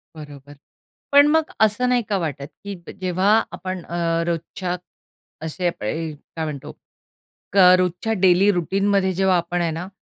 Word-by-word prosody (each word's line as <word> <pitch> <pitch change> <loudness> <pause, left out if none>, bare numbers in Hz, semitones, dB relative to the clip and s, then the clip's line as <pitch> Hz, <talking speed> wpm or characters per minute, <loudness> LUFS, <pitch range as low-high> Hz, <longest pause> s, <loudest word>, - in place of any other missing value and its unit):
बरोबर. 145 -2 -11 0.6
पण 285 +1 +7
मग 315 +1 +2
असं 220 +4 +3
नाही 245 -1 +3
का 200 - +1
वाटत, 145 -5 -4 0.2
की 200 0 -6
प - - -8
जेव्हा 185 +2 +1 0.2
आपण 185 -2 -6
अ, 170 -1 -1
रोजच्या 175 +2 -3 0.7
असे 175 +3 -2
अ 175 - +1
प - - -9
य 160 +8 -3 0.2
काय 160 -1 -2
म्हणतो, 145 -3 -6 0.8
क - - -1 0.2
रोजच्या 180 +5 -1
डेली 185 +2 +5
रूटीनमध्ये 195 +2 +1
जेव्हा 190 -2 +3
आपण 175 +1 -2
आहे 165 -1 0
ना, 180 +2 -5
180 Hz, 160 wpm, -22 LUFS, 165-200 Hz, 0.8 s, पण